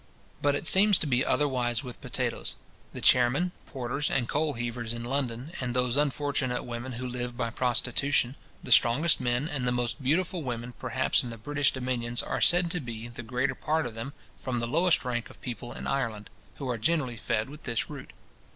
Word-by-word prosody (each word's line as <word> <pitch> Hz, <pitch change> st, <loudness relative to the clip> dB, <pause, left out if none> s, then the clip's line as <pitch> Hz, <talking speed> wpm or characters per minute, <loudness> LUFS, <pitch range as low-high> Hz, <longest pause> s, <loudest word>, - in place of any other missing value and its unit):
But 145 Hz, 0 st, +3 dB
it 145 Hz, -, -3 dB
seems 195 Hz, +3 st, +6 dB
to -, -, -2 dB
be 130 Hz, -2 st, +2 dB
otherwise 125 Hz, -4 st, +1 dB
with 125 Hz, -2 st, -9 dB
potatoes. -, -, -2 dB, 0.4 s
The -, -, -7 dB
chairmen, 130 Hz, +9 st, +4 dB, 0.2 s
porters, 135 Hz, +3 st, -2 dB
and 125 Hz, -3 st, +1 dB
coal 150 Hz, +2 st, +1 dB
heavers 120 Hz, -1 st, -3 dB
in 115 Hz, -, -5 dB
London, 125 Hz, +1 st, -2 dB
and 125 Hz, -1 st, -2 dB
those 125 Hz, -1 st, +2 dB
unfortunate 145 Hz, -3 st, 0 dB
women 120 Hz, +2 st, -5 dB
who 125 Hz, +2 st, -4 dB
live 125 Hz, -1 st, -4 dB
by 115 Hz, -2 st, -1 dB
prostitution, 125 Hz, +2 st, +1 dB, 0.3 s
the -, -, -6 dB
strongest 135 Hz, +7 st, +5 dB
men 125 Hz, +3 st, +1 dB
and 135 Hz, -5 st, -2 dB
the -, -, +3 dB
most 125 Hz, +3 st, -1 dB
beautiful 170 Hz, +6 st, +1 dB
women 120 Hz, -2 st, -4 dB
perhaps -, -, +2 dB
in 125 Hz, -, -5 dB
the 115 Hz, -, -7 dB
British 145 Hz, +4 st, +1 dB
dominions, 120 Hz, -2 st, -1 dB
are -, -, -2 dB
said 175 Hz, -1 st, +4 dB
to 180 Hz, -, 0 dB
be, 120 Hz, -4 st, -6 dB
the 120 Hz, +1 st, -7 dB
greater 125 Hz, +4 st, 0 dB
part 160 Hz, +1 st, 0 dB
of 120 Hz, -, -5 dB
them, 115 Hz, +5 st, -6 dB, 0.2 s
from 125 Hz, -2 st, -2 dB
the 120 Hz, -, 0 dB
lowest 165 Hz, +2 st, +3 dB
rank 120 Hz, -2 st, -2 dB
of -, -, -15 dB
people 120 Hz, -1 st, -6 dB
in -, -, -7 dB
Ireland, 115 Hz, -6 st, -2 dB, 0.2 s
who 140 Hz, -, -5 dB
are 120 Hz, -2 st, -1 dB
generally 135 Hz, -3 st, +1 dB
fed 110 Hz, +1 st, -1 dB
with 150 Hz, +3 st, -11 dB
this 115 Hz, -3 st, -1 dB
root. -, -, -8 dB
125 Hz, 195 wpm, -29 LUFS, 120-145 Hz, 0.4 s, seems